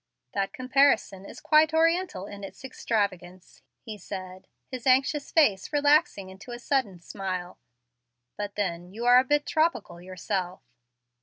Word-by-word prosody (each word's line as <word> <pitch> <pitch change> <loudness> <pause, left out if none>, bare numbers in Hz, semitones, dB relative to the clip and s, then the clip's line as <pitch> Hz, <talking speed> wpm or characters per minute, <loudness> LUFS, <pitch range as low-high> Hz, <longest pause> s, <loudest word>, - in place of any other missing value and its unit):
"That 195 -1 -1
comparison 255 -7 +1
is - - -11
quite 310 0 +3
oriental 330 - +1
in 200 0 -10
its 195 - -10
extravagance," 185 -8 -4 0.2
he 215 -2 -9
said, 185 -1 -8 0.2
his 255 -1 -6
anxious 275 +3 +2
face 215 - +2
relaxing 290 - +2
into 190 +6 -14
a 240 - -6
sudden 240 -7 -1
smile. 185 -1 -6 0.8
"But 205 -1 -6
then 180 -3 -3
you 230 +4 -6
are 245 +1 +7
a - - +2
bit 290 +2 +1
tropical 315 - -1
yourself." 185 0 -4
210 Hz, 140 wpm, -26 LUFS, 190-280 Hz, 0.8 s, are